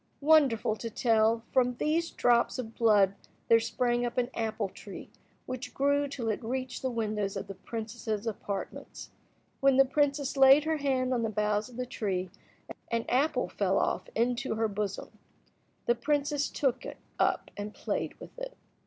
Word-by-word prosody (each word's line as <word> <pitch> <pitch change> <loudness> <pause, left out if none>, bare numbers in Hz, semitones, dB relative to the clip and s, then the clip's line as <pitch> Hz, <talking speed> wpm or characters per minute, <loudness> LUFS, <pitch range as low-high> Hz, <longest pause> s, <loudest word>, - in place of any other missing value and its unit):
Wonderful 280 -8 +4
to 230 - -5
tell! 225 0 +2
from 250 -1 +2
these 325 +5 0
drops 240 +1 +2
of 230 -3 -5
blood 210 -5 +4 0.4
there 230 - +7
sprang 240 +1 0
up 240 0 -3
an 250 0 0
apple 220 -2 -2
tree 195 +1 -10 0.3
which 255 +1 -6
grew 285 +1 +2
till 255 -5 -3
it 215 +3 -2
reached 255 +2 -3
the 260 - -1
windows 210 -4 -2
of 195 - -4
the 195 - -7
princess's 220 +1 -5
apartments. 205 -3 -5 0.5
When 275 -1 +4
the 270 - +7
princess 280 +1 0
laid 270 +2 +7
her 315 0 0
hand 260 -3 0
on 240 - 0
the 225 - 0
boughs 210 +1 0
of 245 - -13
the 250 - -2
tree, 190 -6 -3 0.6
an 230 -1 -1
apple 280 +5 +2
fell - - 0
off - - 0
into 240 -1 0
her 225 0 +1
bosom. 205 -1 -4 0.7
The 240 - +4
princess 290 +2 0
took 260 -3 0
it - - -7 0.2
up - - +1
and 205 +1 -5
played - - -3
with - - -11
it. - - -7
240 Hz, 170 wpm, -29 LUFS, 220-270 Hz, 0.7 s, there